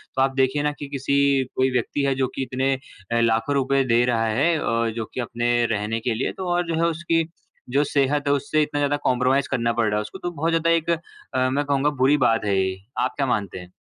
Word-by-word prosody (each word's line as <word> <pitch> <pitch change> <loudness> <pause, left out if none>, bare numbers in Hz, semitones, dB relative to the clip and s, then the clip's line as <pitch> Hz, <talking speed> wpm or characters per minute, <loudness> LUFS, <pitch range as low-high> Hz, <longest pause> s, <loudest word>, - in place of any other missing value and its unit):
तो 130 - +1
आप 135 0 +2
देखिए 135 +2 +1
ना 150 - +1
कि 145 - -5
किसी 140 0 +2
कोई 130 0 +2
व्यक्ति 125 +3 -1
है 135 - +2
जो 130 0 0
कि 135 - -1
इतने 130 +1 0 0.4
अ, 115 - +2
लाखों 115 +4 +1
रुपए 135 0 +2
दे 120 +1 +4
रहा 115 -2 +1
है 155 +9 +2
ओ, 115 0 0
जो 110 0 -4
कि - - -5
अपने 120 0 0
रहने 105 +1 -1
के 115 +1 -1
लिए 115 +4 -1
तो 190 -1 -4
और 175 0 +1
जो 165 - -1
है 170 - +3
उसकी 165 0 0 0.5
जो 140 +4 +2
सेहत 145 0 0
है 140 - +4
उससे 145 +2 +1
इतना 145 -1 -1
ज़्यादा 145 0 +1
कॉन्प्रोमाइज़ 130 +2 +2
करना 115 -3 +1
पड़ 115 -1 +1
रहा 105 - 0
है - - 0
उसको 105 -1 -8
तो 175 - -4
बहुत 165 +1 -1
ज़्यादा 165 0 +1
एक 165 -1 +1 0.4
अ, 130 0 +2
मैं 140 +3 0
कहूँगा 140 +1 +1
बुरी 145 +3 +5
बात 115 -1 +1
है 100 -1 +1
ये। 95 0 -1 0.2
आप - - 0
क्या 140 - +1
मानते 100 -6 -2
हैं? 90 0 -12
135 Hz, 245 wpm, -23 LUFS, 115-145 Hz, 0.5 s, बुरी